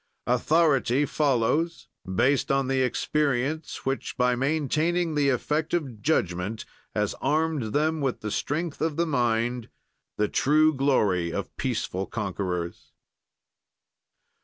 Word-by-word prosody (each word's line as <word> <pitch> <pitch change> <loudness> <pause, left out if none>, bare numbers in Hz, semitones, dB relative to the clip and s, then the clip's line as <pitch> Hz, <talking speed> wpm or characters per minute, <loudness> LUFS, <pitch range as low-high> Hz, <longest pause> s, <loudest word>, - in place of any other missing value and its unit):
"Authority 140 0 +3
follows, 150 +4 0 0.2
based 130 +9 +2
on 135 -1 +1
the 135 0 +1
experience 140 +3 -1
which, 135 0 -2
by 125 -1 +3
maintaining 155 +5 0
the 145 -2 +2
effect 150 +6 0
of 130 -11 -4
judgment, 100 - -1 0.3
has - - 0
armed 155 -4 +1
them 155 +3 +1
with 135 -3 -1
the 105 - -4
strength 155 - -2
of 160 -2 0
the 170 - +2
mind, 120 -4 0 0.5
the 105 - +2
true 155 +6 +3
glory 105 - +1
of - - -5
peaceful 95 +1 -2
conquerors." 90 -5 -4
135 Hz, 115 wpm, -26 LUFS, 115-155 Hz, 0.5 s, Authority